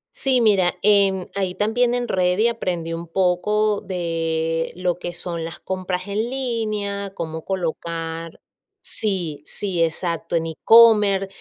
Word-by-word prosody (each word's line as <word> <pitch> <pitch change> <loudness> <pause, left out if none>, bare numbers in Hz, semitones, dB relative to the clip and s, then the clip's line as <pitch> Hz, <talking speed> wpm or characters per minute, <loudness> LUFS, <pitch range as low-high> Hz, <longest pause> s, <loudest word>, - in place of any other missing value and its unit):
Sí, 260 -3 +2
mira, 195 -5 +3
em, 195 -2 +3
ahí 190 -2 -1
también 235 +4 +1
en 245 0 -1
Reddit 185 +5 +2
aprendí 175 -7 -3
un 170 +1 -6
poco 195 +4 +1
de 165 -3 -2
lo 180 -1 -1
que 175 -1 -5
son 170 -1 -4
las 165 +1 -7
compras 185 0 -3
en 215 +4 -1
línea, 215 -6 -2
cómo 160 -2 -5
colocar 165 -2 -4 0.4
sí, 180 -8 -2
sí, 185 -5 -1
exacto, 170 +1 -1
en 165 - -1
e-commerce, 205 +2 +5
185 Hz, 130 wpm, -22 LUFS, 170-210 Hz, 0.4 s, e-commerce